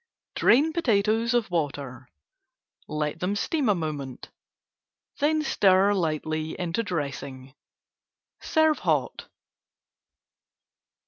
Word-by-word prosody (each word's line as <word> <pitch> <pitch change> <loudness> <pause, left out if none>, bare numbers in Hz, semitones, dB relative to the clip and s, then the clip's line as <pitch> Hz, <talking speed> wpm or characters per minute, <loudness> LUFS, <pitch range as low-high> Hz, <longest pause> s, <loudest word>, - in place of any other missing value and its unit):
Drain 295 +7 +3
potatoes 225 -5 +1
of 235 -6 0
water, 140 -6 -3 0.8
let 150 +1 -3
them 185 +4 -1
steam 275 +4 0
a 205 - +4
moment, 150 -6 -5 0.9
then 305 +2 +2
stir 195 -6 +3
lightly 155 -3 -2
into 175 +4 -1
dressing. 140 - -5 0.9
Serve 315 -1 +2
hot. - - -1
180 Hz, 85 wpm, -26 LUFS, 150-230 Hz, 0.9 s, a